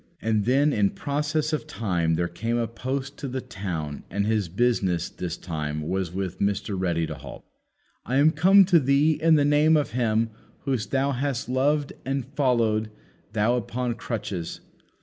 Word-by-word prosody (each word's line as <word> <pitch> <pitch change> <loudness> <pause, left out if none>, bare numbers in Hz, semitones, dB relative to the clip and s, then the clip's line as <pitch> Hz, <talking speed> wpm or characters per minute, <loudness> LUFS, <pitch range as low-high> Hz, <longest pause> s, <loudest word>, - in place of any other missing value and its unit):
And 110 -2 0
then 140 +4 +3
in 100 -2 +3
process 150 +4 -1
of 155 0 -2
time 90 - 0
there 85 +1 0
came 115 +7 -2
a 115 -1 0
post 130 +4 -4
to 140 - -5
the 130 0 -3
town 90 - -5
and 100 0 -1
his 105 -4 0
business 95 -4 +1
this 90 -1 -5
time 75 -3 -4
was 95 -2 -1
with 95 -1 -4
Mr. 100 +1 -1
Ready 85 -3 0
to - - -5
halt. - - -10 0.6
"I 125 - -2
am 145 +3 +5
come 190 +5 +6
to 175 -2 +5
thee 140 +3 +3
in 165 0 +5
the 145 -2 +3
name 150 +2 +4
of 150 - -1
Him 115 -2 +1 0.3
whom 135 -3 0
thou 135 +1 +1
hast 135 -1 -2
loved 140 +3 +1
and 135 -1 -2
followed, 115 -5 +2 0.4
though 110 +3 +2
upon 125 +1 -2
crutches. 105 -7 -5
120 Hz, 170 wpm, -25 LUFS, 95-140 Hz, 0.6 s, come